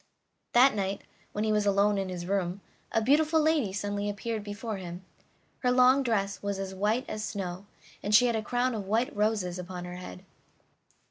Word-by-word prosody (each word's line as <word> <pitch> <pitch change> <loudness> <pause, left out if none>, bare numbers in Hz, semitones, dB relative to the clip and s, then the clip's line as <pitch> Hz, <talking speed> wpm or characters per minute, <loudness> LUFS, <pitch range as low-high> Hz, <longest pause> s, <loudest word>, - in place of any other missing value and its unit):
That 255 +3 +7
night, 195 -1 -2 0.3
when 210 - -2
he 220 - +1
was 210 -1 +2
alone 200 0 +3
in 190 -1 -2
his 175 -1 -5
room, 190 0 -1 0.3
a 225 - +1
beautiful 305 +5 +4
lady 305 -9 +2
suddenly 205 +1 -2
appeared 215 +1 -3
before 205 +1 -5
him; 180 0 -8 0.5
her 250 - +2
long 255 +2 +5
dress 200 -6 -1
was 200 -1 -2
as 195 -1 -4
white 210 +7 0
as 215 0 -4
snow, 190 -2 -5 0.3
and 210 +1 +2
she 245 - +7
had 235 -2 +1
a 220 - 0
crown 245 +3 0
of 205 -4 -4
white 225 +5 0
roses 205 -4 0
upon 180 0 -6
her 180 0 -7
head. 90 - -9
205 Hz, 190 wpm, -29 LUFS, 190-230 Hz, 0.5 s, That